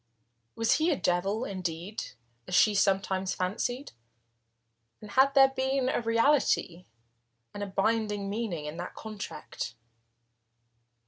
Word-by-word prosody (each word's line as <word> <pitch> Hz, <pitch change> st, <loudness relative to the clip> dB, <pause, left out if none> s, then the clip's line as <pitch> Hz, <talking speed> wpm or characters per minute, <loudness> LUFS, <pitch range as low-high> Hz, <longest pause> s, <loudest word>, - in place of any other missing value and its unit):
Was 225 Hz, 0 st, +3 dB
he 320 Hz, +2 st, +2 dB
a 320 Hz, -, +3 dB
devil, 195 Hz, +3 st, 0 dB
indeed, 185 Hz, +1 st, -4 dB, 0.4 s
as 180 Hz, -, -1 dB
she 215 Hz, -, +5 dB
sometimes 195 Hz, -1 st, +1 dB
fancied, 235 Hz, +8 st, -2 dB, 1.1 s
and 210 Hz, -1 st, -11 dB
had 270 Hz, +3 st, +4 dB
there 270 Hz, -1 st, +8 dB
been 265 Hz, 0 st, 0 dB
a -, -, 0 dB
reality 230 Hz, -, +2 dB, 0.7 s
and 205 Hz, -, -6 dB
a 205 Hz, -, -2 dB
binding 205 Hz, +1 st, 0 dB
meaning 200 Hz, -7 st, -3 dB
in 150 Hz, +2 st, -6 dB
that 175 Hz, +1 st, -6 dB
contract? 210 Hz, -, -6 dB
205 Hz, 120 wpm, -29 LUFS, 185-240 Hz, 1.1 s, there